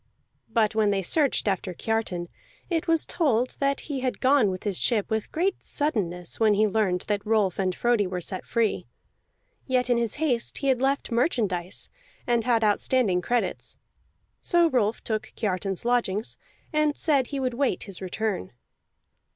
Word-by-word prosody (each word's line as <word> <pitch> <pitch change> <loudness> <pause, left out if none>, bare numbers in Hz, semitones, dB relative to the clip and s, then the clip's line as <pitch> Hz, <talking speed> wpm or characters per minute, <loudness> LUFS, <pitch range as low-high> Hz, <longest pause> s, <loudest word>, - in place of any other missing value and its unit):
But 220 -1 +2
when 215 -1 +2
they 195 -1 0
searched 280 - +1
after 190 -2 -1
Kiartan, 215 -6 -2 0.4
it 335 0 0
was 330 -1 +3
told 255 -7 +1
that 275 -1 +1
he 285 -3 -4
had 255 -1 -2
gone 260 -5 +4
with 185 -1 -5
his 200 -4 -2
ship 220 -4 0
with 220 -1 -2
great 370 +4 0
suddenness 180 - -2
when 215 -2 +4
he 215 +2 +4
learned 195 -4 +1
that 205 -1 -2
Rolf 210 -4 +1
and 185 -2 0
Frodi 235 -5 +2
were 180 0 -3
set 185 +2 -4
free. 230 -3 0 0.8
Yet 255 -1 +1
in 240 - +4
his 235 -2 0
haste 270 -7 0
he 275 - 0
had 255 -2 +2
left 270 -1 0
merchandise, 210 - -1 0.4
and 235 -2 +1
had 235 -3 +2
outstanding 210 -2 +2
credits; 240 +5 -2 0.6
so 345 -2 +3
Rolf 225 -3 +1
took 220 -1 -3
Kiartan's 195 -1 -2
lodgings, 235 -4 0 0.3
and 305 -1 +2
said 280 -5 +2
he 280 - -4
would 255 -2 -1
wait 270 +2 0
his 195 -3 -6
return. 190 - -3
225 Hz, 165 wpm, -26 LUFS, 200-260 Hz, 0.8 s, gone